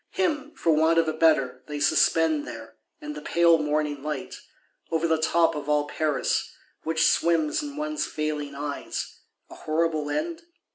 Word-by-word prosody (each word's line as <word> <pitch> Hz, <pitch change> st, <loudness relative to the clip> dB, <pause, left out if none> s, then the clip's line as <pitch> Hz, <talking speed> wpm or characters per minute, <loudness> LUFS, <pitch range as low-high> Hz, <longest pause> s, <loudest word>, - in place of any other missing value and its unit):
Him, 310 Hz, -6 st, -1 dB
for 165 Hz, -, +2 dB
want 160 Hz, +2 st, +3 dB
of 165 Hz, -1 st, +3 dB
a 155 Hz, -, 0 dB
better, 135 Hz, -6 st, +2 dB
they 150 Hz, -1 st, -5 dB
suspend 155 Hz, +1 st, +2 dB
there; 115 Hz, -2 st, -9 dB, 0.3 s
in 150 Hz, 0 st, -6 dB
the 150 Hz, -, -8 dB
pale 170 Hz, +1 st, +4 dB
morning 150 Hz, -1 st, -1 dB
light; 150 Hz, -1 st, -4 dB, 0.6 s
over 165 Hz, 0 st, 0 dB
the 160 Hz, -1 st, +2 dB
top 165 Hz, 0 st, +3 dB
of 150 Hz, -1 st, -5 dB
all 150 Hz, 0 st, +2 dB
Paris, 150 Hz, -1 st, -1 dB, 0.3 s
which 160 Hz, 0 st, +1 dB
swims 165 Hz, -, +2 dB
in 290 Hz, -1 st, -7 dB
one's 305 Hz, 0 st, -2 dB
failing 150 Hz, -2 st, -3 dB
eyes:—a 145 Hz, 0 st, -7 dB
horrible 155 Hz, -1 st, -1 dB
end? 330 Hz, -, -2 dB
155 Hz, 155 wpm, -26 LUFS, 150-165 Hz, 0.6 s, pale